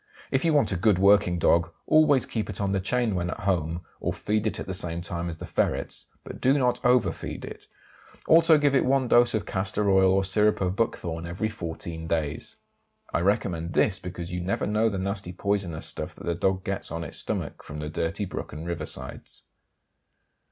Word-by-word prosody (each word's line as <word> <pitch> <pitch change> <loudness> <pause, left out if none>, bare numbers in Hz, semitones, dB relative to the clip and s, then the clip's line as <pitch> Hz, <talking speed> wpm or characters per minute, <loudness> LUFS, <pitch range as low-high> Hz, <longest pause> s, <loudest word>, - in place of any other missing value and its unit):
If 130 - +1
you 165 - +3
want 145 -6 +3
a 95 - 0
good 100 +1 +3
working 100 -2 +4
dog 85 0 +3 0.2
always 150 -4 +4
keep 110 -2 -3
it 100 - -6
on 100 -1 0
the 100 - +1
chain 120 +3 0
when 90 -1 -1
at 110 - -5
home, 85 -4 0 0.2
and - - -1
feed 105 +1 0
it - - -2
at - - -4
the 95 - -4
same 85 -2 -3
time 85 -1 -4
as 80 - -6
the - - -7
ferrets, - - -1 0.2
but - - -9
do 135 +3 +4
not 125 -2 +1
over 125 -1 +4
feed - - -7
it; - - -10 0.6
also 165 -1 +7
give 145 -1 +2
it 135 - +4
one 130 -1 +2
dose 120 -1 +5
of 110 - -1
castor 100 +1 0
oil 95 -1 +5
or 95 +1 +3
syrup 105 +2 +2
of 95 0 0
buckthorn 85 -6 -2
every 90 +6 -2
14 80 -4 -6
days. 75 -3 -2 0.6
I - - +2
recommend 90 -3 0
this 95 -3 +2
because 90 -1 -6
you 90 - -2
never 90 +3 -1
know 110 +2 +2
the 100 - -3
nasty 100 -1 -3
poisonous 95 -4 -2
stuff - - -5
that - - -11
the 85 - 0
dog 95 +2 0
gets 100 0 -3
on 85 0 -3
its 75 - -5
stomach - - -4
from 75 - -9
the 75 0 -4
dirty 80 +6 -2
brook - - -6
and 75 +2 -7
river 85 -3 -3
sides. 65 +1 -8
95 Hz, 210 wpm, -26 LUFS, 85-110 Hz, 0.6 s, also